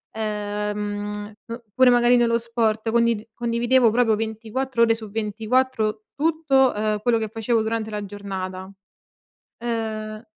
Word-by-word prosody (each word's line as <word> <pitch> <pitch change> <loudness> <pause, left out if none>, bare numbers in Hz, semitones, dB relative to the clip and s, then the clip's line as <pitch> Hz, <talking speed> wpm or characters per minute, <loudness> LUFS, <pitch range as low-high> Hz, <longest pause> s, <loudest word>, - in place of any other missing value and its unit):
ehm, 210 -1 -3
p 235 +1 -7
pure 260 -1 +6
magari 245 0 +5
nello 230 -1 +3
sport 230 -1 0
condi 230 -2 +1
condividevo 235 +1 +2
proprio 225 -1 +3
24 225 +3 -1
ore 225 -1 +4
su 220 -2 -9
24 220 +1 0
tutto, 290 -4 +2
ehm, 210 0 -1
quello 235 +1 +2
che 220 - -2
facevo 225 +1 0
durante 220 0 -2
la 210 -1 -4
giornata. 190 -2 -6 0.9
Uhm, 220 -2 -4
225 Hz, 125 wpm, -23 LUFS, 210-235 Hz, 0.9 s, pure